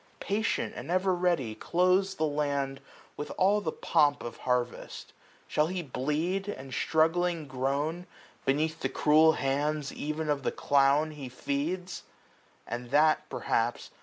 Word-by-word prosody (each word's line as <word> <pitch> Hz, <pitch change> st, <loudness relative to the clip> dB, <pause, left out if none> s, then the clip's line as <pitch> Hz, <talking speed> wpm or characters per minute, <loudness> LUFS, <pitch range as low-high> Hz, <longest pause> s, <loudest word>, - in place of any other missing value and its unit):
Patient 215 Hz, +3 st, -1 dB
and -, -, -7 dB
ever 185 Hz, +1 st, +2 dB
ready, 175 Hz, -10 st, 0 dB
clothes 185 Hz, -, +2 dB
the 160 Hz, -, -2 dB
land 140 Hz, -2 st, -1 dB, 0.3 s
With 145 Hz, -, -5 dB
all 200 Hz, +3 st, +3 dB
the 160 Hz, -, -2 dB
pomp 145 Hz, -3 st, +2 dB
of 120 Hz, -, -6 dB
harvest; 125 Hz, -1 st, -3 dB, 0.3 s
shall 150 Hz, 0 st, +2 dB
he 180 Hz, 0 st, -3 dB
bked, 135 Hz, -, -18 dB, 0.5 s
365 205 Hz, -, -4 dB
And 130 Hz, -1 st, -9 dB
struggling 165 Hz, +2 st, +1 dB
groan 140 Hz, +7 st, -2 dB, 0.4 s
beneath 150 Hz, +4 st, 0 dB
the -, -, -1 dB
cruel 155 Hz, +1 st, +5 dB
hands 145 Hz, +1 st, -1 dB
Ev'n 155 Hz, +1 st, -3 dB
of 145 Hz, -2 st, 0 dB
the -, -, -1 dB
clown 140 Hz, +2 st, +3 dB
he 145 Hz, -4 st, -8 dB
feeds? 155 Hz, +8 st, -3 dB, 0.6 s
and 120 Hz, +1 st, -5 dB
that, 155 Hz, +2 st, +3 dB
perhaps. 115 Hz, +1 st, -1 dB
150 Hz, 140 wpm, -29 LUFS, 140-175 Hz, 0.6 s, cruel